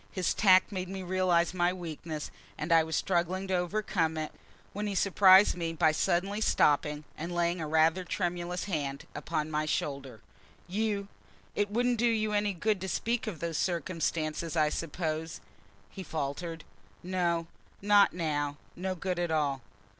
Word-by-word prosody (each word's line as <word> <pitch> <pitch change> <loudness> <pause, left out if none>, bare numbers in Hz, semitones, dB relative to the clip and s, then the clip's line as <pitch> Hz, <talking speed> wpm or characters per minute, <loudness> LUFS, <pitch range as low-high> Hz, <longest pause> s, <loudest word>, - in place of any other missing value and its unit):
His 185 -2 0
tact 185 -2 +5
made 185 -2 -4
me 190 -1 -5
realize 180 -2 +2
my 175 -1 +2
weakness, 165 -3 -6 0.3
and 155 +3 -4
I 165 -1 +6
was 160 -1 -3
struggling 180 +5 0
to - - 0
overcome 180 -3 0
it 155 -1 -3 0.4
when 210 +1 -3
he 200 - -3
surprised 190 0 +6
me 165 -2 -3
by 160 -1 +3
suddenly 195 +6 0
stopping 150 -5 +2
and 170 +3 -5
laying 175 0 0
a 155 - -3
rather 160 +4 +3
tremulous 175 0 -2
hand 145 -7 -3
upon 155 +1 -3
my 155 0 -1
shoulder. 140 -6 -3 0.5
"You 200 +1 -1 0.5
It 205 0 0
wouldn't 240 +2 +1
do 240 - +3
you 215 -2 0
any 205 0 +1
good 200 +2 0
to 190 - -3
speak 235 +4 -1
of 185 -8 -5
those 165 -2 -2
circumstances, 165 -2 -2
I 155 -1 +4
suppose?" 160 0 -3 0.5
he 195 - -8
faltered. 160 0 -4 0.4
"No: 175 -2 0 0.3
not 205 0 +5
now: 145 -4 -2 0.2
no 185 +1 -3
good 180 0 -3
at 175 -1 0
all." 145 -4 0
175 Hz, 160 wpm, -30 LUFS, 160-190 Hz, 0.5 s, I